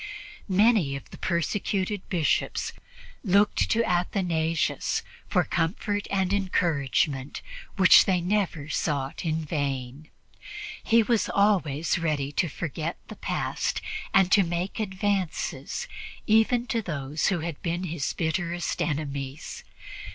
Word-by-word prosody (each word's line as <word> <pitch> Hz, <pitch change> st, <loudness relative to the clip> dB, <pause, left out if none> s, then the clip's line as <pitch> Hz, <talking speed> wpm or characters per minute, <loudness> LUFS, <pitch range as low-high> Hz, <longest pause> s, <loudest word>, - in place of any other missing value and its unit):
Many 195 Hz, -7 st, +4 dB
of 135 Hz, -, -9 dB
the -, -, -10 dB
persecuted 190 Hz, +3 st, -1 dB
Bishops 170 Hz, -5 st, 0 dB, 0.5 s
looked 200 Hz, 0 st, +3 dB
to 230 Hz, +1 st, +3 dB
Athanasius 175 Hz, -4 st, 0 dB, 0.2 s
for -, -, +2 dB
the -, -, -15 dB
comfort 205 Hz, +5 st, -1 dB
and 190 Hz, -1 st, +1 dB
encouragement 150 Hz, -7 st, 0 dB, 0.3 s
which 190 Hz, -2 st, +8 dB
they 185 Hz, -2 st, +2 dB
never 180 Hz, -5 st, -1 dB
sought 140 Hz, -3 st, -2 dB
in 160 Hz, -1 st, -1 dB
vain. 140 Hz, -1 st, -3 dB, 0.7 s
He 230 Hz, -1 st, +5 dB
was 230 Hz, 0 st, +1 dB
always 180 Hz, -6 st, +2 dB
ready 150 Hz, -4 st, -1 dB
to 165 Hz, +3 st, 0 dB
forget 160 Hz, +2 st, -4 dB
the -, -, -7 dB
past -, -, -2 dB, 0.3 s
and 190 Hz, -1 st, +4 dB
to 205 Hz, -, +7 dB
make 175 Hz, +3 st, -2 dB
advances 195 Hz, -4 st, -2 dB, 0.4 s
even 225 Hz, +3 st, +3 dB
to 235 Hz, -2 st, -1 dB
those 145 Hz, -5 st, -2 dB
who 175 Hz, -4 st, +1 dB
had 165 Hz, -2 st, -5 dB
been 175 Hz, 0 st, -2 dB
his 165 Hz, -5 st, -2 dB
bitterest 170 Hz, +1 st, -1 dB
enemies. 140 Hz, -2 st, -3 dB
170 Hz, 120 wpm, -27 LUFS, 150-195 Hz, 0.7 s, which